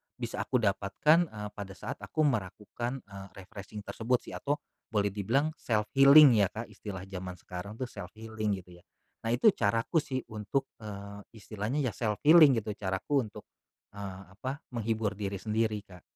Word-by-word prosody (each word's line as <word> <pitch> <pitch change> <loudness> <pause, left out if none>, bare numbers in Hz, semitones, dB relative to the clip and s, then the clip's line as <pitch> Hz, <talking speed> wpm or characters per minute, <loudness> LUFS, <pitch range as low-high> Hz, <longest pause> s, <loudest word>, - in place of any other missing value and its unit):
bisa - - -5
aku - - -3
dapatkan, 105 - +3
eee, 105 -5 -7
pada 100 -1 -7
saat 135 +7 -6
aku 155 - -1
meragukan, 120 +1 -2
eee, 100 -1 -10 0.2
refreshing 100 +2 -9
tersebut 120 +4 -1
sih - - -10
atau 145 +1 -1 0.3
boleh 105 -2 +1
dibilang 125 +10 +1
self 105 -3 0
healing 140 0 +9
ya 95 - +3
Kak, 115 +2 -6
istilah 95 -3 -7
jaman 90 -1 -5
sekarang 90 +5 -8
tuh 130 - -2
self 100 -5 -8
healing 110 -2 -2
gitu 90 0 -16
ya. - - -36 0.4
Nah, - - 0
itu 175 - +6
caraku 115 - +1
sih 130 -3 -3
untuk, 110 +6 -1 0.2
eee, 100 -1 -7 0.2
istilahnya 110 +4 -4
ya 125 -5 -1
self 105 -1 -1
healing 155 -3 +9
gitu 110 -1 -2
caraku 100 +9 0
untuk, 105 0 -11 0.5
eee, 100 -2 -7
apa, 130 +8 -5
menghibur 110 -2 -1
diri 100 -1 -3
sendiri 110 0 0
Kak. 90 -3 -14
105 Hz, 170 wpm, -30 LUFS, 100-125 Hz, 0.5 s, healing